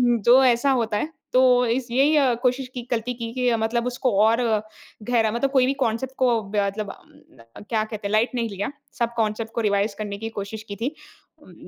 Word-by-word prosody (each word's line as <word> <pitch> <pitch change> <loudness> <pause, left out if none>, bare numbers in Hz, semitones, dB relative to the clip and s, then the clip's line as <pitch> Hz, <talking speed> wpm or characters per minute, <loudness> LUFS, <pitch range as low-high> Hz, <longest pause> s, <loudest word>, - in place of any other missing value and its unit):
उम, - - -1
जो 250 +5 +6
ऐसा 250 +2 +3
होता 220 -3 0
है, 300 - -2 0.2
तो 250 -1 +5
इस 240 +2 -1
यही 275 -1 +3
कोशिश 255 +1 +1
की 245 -1 -7
गलती 240 +1 -1
की 230 -1 -6
कि 250 -2 +1
मतलब 230 +2 -1
उसको 250 0 -1
और 225 +2 +3 0.7
गहरा 225 -3 +2
मतलब 265 +4 -1
कोई 260 -2 +4
भी 270 - +1
कॉन्सेप्ट 250 +4 -3
को 240 -3 +2
ब 200 +2 -5
मतलब 205 +1 -4
उम, - - -16 0.3
क्या 220 -2 +1
कहते 215 -2 -5
हैं - - -5
लाइट 215 +3 +2
नहीं 230 -2 -1
लिया 200 +6 -4 0.3
सब 235 0 0
कॉन्सेप्ट 220 0 -1
को 235 - 0
रिवाइज़ 205 -1 +1
करने 205 -1 -4
की 225 +2 -5
कोशिश 215 0 -6
की 200 - -5
थी। 255 +9 -3 0.5
उम, - - -16
235 Hz, 210 wpm, -23 LUFS, 215-250 Hz, 0.7 s, जो